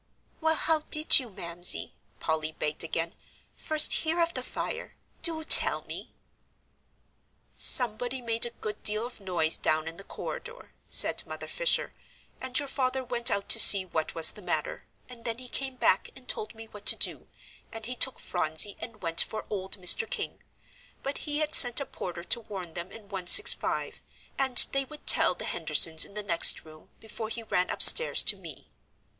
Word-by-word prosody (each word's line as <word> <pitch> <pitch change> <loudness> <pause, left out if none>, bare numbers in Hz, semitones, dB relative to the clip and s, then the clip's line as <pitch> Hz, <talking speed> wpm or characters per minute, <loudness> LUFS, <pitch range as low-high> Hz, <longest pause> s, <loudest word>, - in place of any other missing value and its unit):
"Well, 320 0 -1
how 320 0 -2
did 305 0 +3
you, 250 -3 -10
Mamsie," 175 -2 -2 0.3
Polly 160 -1 -5
begged 150 +1 -5
again, 165 +1 -5 0.4
"first 310 -1 +2
hear 325 +2 -4
of 335 0 -1
the - - -5
fire? - - -8 0.3
Do 320 -2 -3
tell - - +8
me." - - -11 1.4
"Somebody 245 +1 +3
made 230 -1 -3
a 235 - -16
good 210 -1 -8
deal 215 +2 0
of 245 - -12
noise 175 -5 -1
down 155 0 -2
in 165 +1 -9
the 195 - -12
corridor," 475 - -11 0.2
said - - +2
Mother - - -9
Fisher, - - -2 0.5
"and 260 0 -3
your 285 - 0
father 265 -2 -4
went 240 -1 0
out 200 0 -4
to - - +5
see 195 -2 +8
what 160 -3 -6
was 165 -1 +2
the - - -16
matter, - - -6 0.2
and 245 -2 -14
then 230 0 -5
he 255 0 -10
came 265 +1 -5
back 195 -6 -1
and 260 -1 -17
told 215 +1 -5
me 225 0 -12
what 210 -1 -13
to - - +7
do, - - -1 0.4
and 225 -1 -8
he 250 +2 -6
took 260 +1 0
Phronsie 160 +3 -1
and 225 -3 -12
went 165 -1 +2
for 215 - -7
old 190 -1 -6
Mr. 190 - +5
King. 485 -4 -7 0.6
But 275 +1 -5
he 295 - -1
had 305 0 -2
sent 245 -3 +5
a 280 - -6
porter 175 -7 -10
to 235 - 0
warn 190 -7 -11
them 175 +2 -9
in 225 - -12
165, 195 - +2 0.4
and 265 -2 +3
they 275 0 -3
would 300 +3 -15
tell - - +4
the - - -10
Hendersons 160 -1 +3
in 200 - -18
the 210 - -6
next 170 -4 +1
room, 155 0 -19
before 220 0 -9
he 230 0 -9
ran 180 -4 -3
upstairs 485 - +6
to - - +4
me." - - -13
225 Hz, 185 wpm, -25 LUFS, 180-270 Hz, 1.4 s, tell